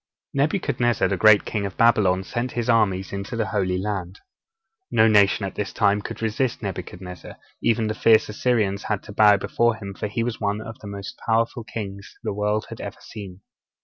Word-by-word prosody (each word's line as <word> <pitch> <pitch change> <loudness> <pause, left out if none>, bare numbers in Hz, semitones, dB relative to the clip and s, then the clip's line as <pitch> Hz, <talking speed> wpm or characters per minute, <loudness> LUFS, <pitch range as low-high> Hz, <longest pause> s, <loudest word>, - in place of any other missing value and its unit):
Nebuchadnezzar, 135 - +1
the - - +1
great 110 -2 +6
king 105 - -2
of 100 -1 -5
Babylon, 100 -5 +4
sent 120 +5 -3
his 120 -1 -2
armies 100 -5 +2
into 100 +5 -4
the 115 -1 0
Holy 95 -2 0
Land. 95 -1 -4 0.7
No 110 - +4
nation 105 -1 +4
at 95 - -5
this 105 -1 -3
time 105 -1 +2
could 115 - -7
resist 115 +2 -1
Nebuchadnezzar; 90 -2 -7 0.3
even 115 -1 +2
the 110 - -1
fierce 110 0 +4
Assyrians 105 -3 0
had 105 -2 -2
to 105 - -10
bow 105 -1 +6
before 120 +3 +1
him, 100 -3 -7
for 105 - -4
he 115 +3 -2
was 120 -1 -4
one 100 0 0
of 110 0 -8
the 105 - -10
most 100 -1 -7
powerful 115 +1 0
kings 100 -3 -7
the - - -2
world 105 +1 0
has - - -8
ever - - -6
seen. 95 -3 -10
105 Hz, 190 wpm, -23 LUFS, 100-115 Hz, 0.7 s, great